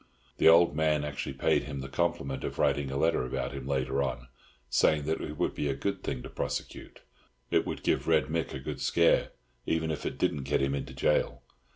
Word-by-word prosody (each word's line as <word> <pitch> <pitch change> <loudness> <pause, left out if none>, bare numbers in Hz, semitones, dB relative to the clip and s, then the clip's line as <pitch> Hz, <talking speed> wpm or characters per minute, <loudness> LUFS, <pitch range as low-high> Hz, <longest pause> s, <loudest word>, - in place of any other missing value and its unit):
The - - +7
old 85 -1 +6
man 75 -1 +2
actually 70 -2 -4
paid 65 - +1
him 70 -2 -5
the 65 - -6
compliment 65 0 -1
of - - -4
writing 70 -2 +1
a 70 - -3
letter 80 -1 +2
about 65 0 -3
him 70 -1 -6
later 65 0 0
on, 65 -2 -3 0.4
saying 75 +4 +3
that 80 +2 -1
it 75 - -6
would - - 0
be 75 - -2
a 70 - 0
good 100 +7 -2
thing 60 - -4
to - - -8
prosecute—it 60 0 -4
would - - -4
give - - +1
Red - - +4
Mick - - -2
a - - -4
good 65 - -6
scare, 85 -1 +3 0.4
even 80 0 0
if 75 - -4
it - - -3
didn't 70 - 0
get 70 - +1
him 70 +1 +1
into 70 - -4
gaol. 75 - +1
70 Hz, 210 wpm, -29 LUFS, 65-75 Hz, 0.4 s, The